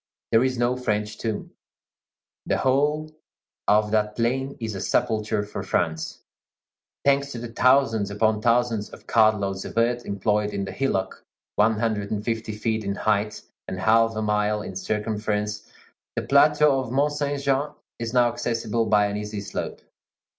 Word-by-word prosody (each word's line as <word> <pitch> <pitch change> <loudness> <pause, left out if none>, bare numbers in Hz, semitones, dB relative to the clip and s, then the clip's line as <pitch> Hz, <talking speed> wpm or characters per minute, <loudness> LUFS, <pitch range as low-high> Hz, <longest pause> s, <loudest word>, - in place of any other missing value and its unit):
There 115 +2 +5
is 130 -1 0
no 120 +1 +1
French 105 -4 -2
tomb. 110 -2 -3 1.0
The - - +2
whole 150 +4 +1 0.6
of 105 0 +3
that 105 -1 +1
plain 130 +4 -1
is 110 -2 -3
a 95 - -5
sepulchre 110 -1 0
for 105 - -6
France. 80 -1 -2 0.8
Thanks 140 0 +3
to - - -5
the 120 0 -6
thousands 115 -4 +3
upon 110 +1 +1
thousands 115 -2 +1
of - - -13
cartloads 100 -4 +2
of - - -8
earth 120 +1 +2
employed 105 +1 0
in 100 -1 -2
the - - -6
hillock 95 -9 -2 0.3
one 110 +1 +3
hundred 105 -2 -1
and 105 -1 -3
fifty 115 -2 -2
feet 110 0 -1
in 100 0 -2
height 105 0 0 0.2
and 95 - -4
half 115 +3 +3
a 110 - -1
mile 105 0 +1
in 95 - -7
circumference, 105 +1 -2 0.4
the - - -1
plateau 145 0 +4
of 130 -3 -4
Mont 145 +3 +2
Saint 145 -1 -1
Jean 140 +1 +1 0.3
is 115 -1 -3
now 120 -1 +4
accessible 115 -1 -1
by 105 -1 +4
an 100 0 -2
easy 105 0 -4
slope. 100 - -5
110 Hz, 160 wpm, -24 LUFS, 105-125 Hz, 1.0 s, There